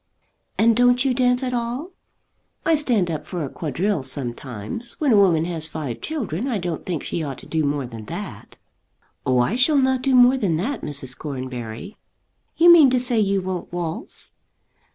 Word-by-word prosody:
"And 230 0 +4
don't 245 +2 +4
you 265 - +2
dance 250 0 +2
at 250 -1 -2
all?" 245 +8 -3 0.7
"I 330 - +3
stand 240 - +1
up 155 - -4
for 175 -5 -3
a - - -6
quadrille 175 +3 -1
sometimes. 130 - -5
When 295 -4 0
a - - +6
woman 175 -6 +4
has 165 -3 0
five 150 -7 -5
children 255 - -3
I 245 -5 -1
don't 175 -4 -4
think 170 -6 -2
she 170 - -3
ought 140 -4 -4
to - - -13
do 160 -1 -1
more 145 -1 -1
than 115 -3 -9
that." - - -8 0.7
"Oh, 130 -1 +3
I 125 - +2
shall 265 +4 +3
not 260 -1 +2
do 265 0 +2
more 250 +1 +6
than 185 -10 0
that, 230 - -2
Mrs. 135 -3 -3
Cornbury." 130 - -6 0.6
"You 345 +1 +8
mean 310 -6 +7
to 255 0 +2
say 245 -2 +2
you 195 -2 +1
won't 185 -2 -4
waltz?" 175 -2 -1
190 Hz, 185 wpm, -22 LUFS, -, 0.7 s, You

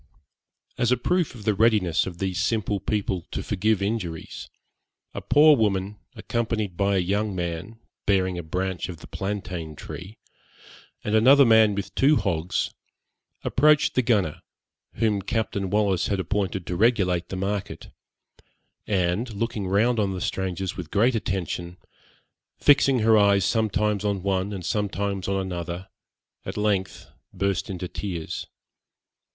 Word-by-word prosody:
As 120 0 +2
a 125 - +4
proof 175 +3 0
of 110 - -10
the 110 - +3
readiness 105 -7 +2
of 90 -2 -7
these 95 -1 -2
simple 110 -3 0
people 95 -5 -2
to - - -4
forgive 105 0 0
injuries, 100 -6 -4 0.6
a - - -5
poor 150 +1 +6
woman, 100 -3 0 0.2
accompanied 110 -5 -2
by 100 +2 +1
a - - +3
young 100 +3 -1
man 90 +5 -4 0.3
bearing 95 -2 +2
a 85 - -3
branch 90 +3 -3
of 90 - -6
the - - -12
plantain 90 -5 -5
tree, 95 +8 -9 0.9
and 105 - -2
another 135 +6 +7
man 110 -3 +5
with 100 - -5
two 145 +3 +4
hogs, 90 - -1 0.7
approached 150 +2 +3
the 130 - +3
gunner, 105 -10 +1 0.5
whom 105 -2 +1
Captain 100 -2 -2
Wallis 100 -3 +1
had 100 - -1
appointed 95 0 -2
to 90 - -3
regulate 90 -5 +2
the - - -4
market, 100 +1 -4 1.0
and 95 +4 0
looking 105 -2 -2
round 110 +5 +2
on 100 -2 0
the - - -4
strangers 95 0 -2
with 90 -5 -7
great 115 +9 +3
attention, 90 -4 -3 0.8
fixing 135 -3 +4
her 110 0 +5
eyes 100 -2 +4
sometimes 105 0 +1
on 100 -3 -1
one 95 0 0
and 95 -4 -6
sometimes 100 -1 -2
on 95 0 0
another, 90 -1 -5 0.5
at - - -6
length 105 -3 -1 0.2
burst 100 -1 -1
into 90 -1 -4
tears. 90 -4 -5
100 Hz, 145 wpm, -25 LUFS, 95-110 Hz, 1.0 s, another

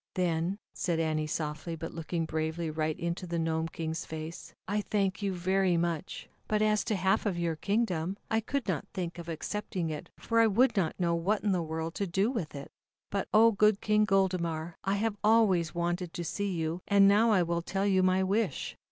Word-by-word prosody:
"Then," 175 +1 0 0.2
said 170 -2 -1
Annie 155 -1 0
softly, 155 +2 -3
but 165 0 -6
look 165 -1 -8
ing 165 -2 0
bravely 160 +1 -2
right 155 +1 -2
into 170 +1 -3
the 170 0 -2
Gnome 160 0 0
King's 160 0 -4
face: 160 +1 -7
"I 205 +2 0
thank 200 -1 -1
you 200 -1 0
very 185 0 +1
much, 170 -2 -2 0.2
but 215 - +1
as 215 -1 +2
to 215 - 0
half 190 +3 +1
of 185 -4 -1
your 170 -1 0
kingdom, 190 -2 -1
I 220 - +1
could 255 +3 -3
not 175 -6 -1
think 175 -2 -4
of 170 0 -7
accepting 170 0 -3
it 150 - -6
for 230 0 0
I 230 - +6
would 235 +3 +3
not 185 -4 0
know 170 -2 +2
what 185 +6 0
in 210 - +2
the 180 -2 +1
world 160 0 -3
to 200 - +1
do 195 +7 +1
with 185 - -4
it. 140 0 -8 0.4
"But, 200 -1 -1
oh! 225 +2 +6
good 210 -1 +3
King 210 0 +3
Goldemar, 175 -4 0
I 195 +1 +1
have 210 0 -1
always 200 -7 +3
wanted 175 0 -2
to 175 - -3
see 200 +5 -2
you, 165 0 -2
and 200 -1 +6
now 210 +3 +5
I 195 -5 +4
will 170 0 -1
tell 195 +3 -2
you 190 -2 +3
my 185 0 +3
wish. 195 -4 -1
180 Hz, 210 wpm, -30 LUFS, 165-200 Hz, 0.4 s, I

